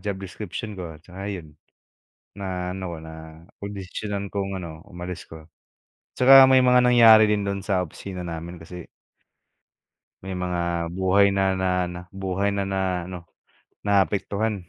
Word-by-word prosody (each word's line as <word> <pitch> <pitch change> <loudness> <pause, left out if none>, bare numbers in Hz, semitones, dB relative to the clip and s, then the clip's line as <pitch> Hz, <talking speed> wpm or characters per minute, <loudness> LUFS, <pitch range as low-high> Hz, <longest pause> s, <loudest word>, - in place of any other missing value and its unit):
job 100 -2 -3
description 100 +3 -7
ko. 90 -5 -7
Tsaka 95 +2 -7
'yon. 85 -7 -7 0.8
Na 90 -2 -4
ano 95 0 -6
ko, 85 - -6
napagdesisyunan 95 +5 -7
kong 100 -1 -2
ano, 80 -4 -7
umalis 90 -2 -8
'ko. 80 -1 -11 0.7
'Tsaka 135 +1 +8
may 130 -1 +5
mga 125 0 +5
nangyari 115 -3 +7
din 105 -1 +1
dun 100 -1 -3
sa 95 -3 +1
opisina 90 +2 -7
namin 85 0 -7
kasi. 90 +1 -10 1.4
May 95 -1 -5
mga 90 -1 -1 0.4
buhay 95 +1 +4
na, 95 - +2 0.2
na 95 - +1 0.2
na 90 - -7 0.2
buhay 95 +1 0
na, 100 - 0
na 95 - 0 0.3
ano, 90 -1 -6 0.7
naapektuhan. 100 +2 +1
95 Hz, 140 wpm, -24 LUFS, 90-100 Hz, 1.4 s, Tsaka